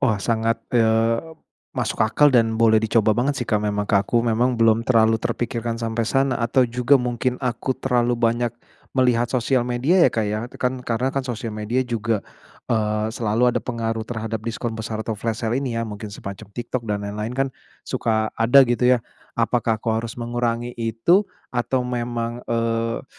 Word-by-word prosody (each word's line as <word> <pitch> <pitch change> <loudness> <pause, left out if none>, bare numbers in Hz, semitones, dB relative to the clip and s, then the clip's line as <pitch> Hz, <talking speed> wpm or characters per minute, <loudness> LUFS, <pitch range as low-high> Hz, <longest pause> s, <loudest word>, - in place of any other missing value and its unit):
Wah 120 -6 +2
sangat, 115 +3 0 0.2
eee, 115 -1 +3 0.6
masuk - - -2
akal 140 +6 +4
dan 115 -2 +3
boleh 110 -1 +5
dicoba 110 -1 +3
banget 135 +5 0
sih 120 - -3
Kak 105 -2 +1
memang 105 -1 -1
ke - - 0
aku 115 +4 0
memang 120 +2 +1
belum 115 0 +4
terlalu 115 -2 +3
terpikirkan 115 0 -2
sampai 115 0 -1
sana, 135 -1 +1
atau 120 +3 +3
juga 125 +3 +3
mungkin 125 0 -1
aku 125 0 -2
terlalu 120 -2 +1
banyak 120 0 +1 0.4
melihat 120 -2 +3
sosial 130 0 +1
media 125 +9 +2
ya - - -9
Kak 110 -2 -1
ya, 105 +1 -1 0.2
kan 125 0 -1
karena 125 +3 -1
kan 135 - +1
sosial 115 -3 -4
media 115 +5 -1
juga, 115 -3 -1 0.5
eee, 105 -1 0
selalu 115 +2 +1
ada - - +1
pengaruh 115 -2 -3
terhadap 115 -2 -3
diskon 115 0 -3
besar 110 0 -4
atau 110 - -2
flash 110 +1 -3
sale 120 +4 0
ini 125 -4 -3
ya, 115 - -1
mungkin 105 0 -7
semacam 100 -1 -8
TikTok 120 +3 -4
dan 105 -1 -2
lain-lain 105 +3 -4
kan 135 0 +1 0.4
suka 110 -1 -1
ada 125 +4 +7
gitu 125 +1 +3
ya, - - -4 0.4
apakah 115 -1 +1
aku 115 +1 -1
harus 115 -1 -7
mengurangi 120 0 -2
itu 115 - +3 0.3
atau 125 +1 0
memang, 120 -1 -3
eee, 115 0 -1
115 Hz, 175 wpm, -22 LUFS, 110-125 Hz, 0.6 s, ada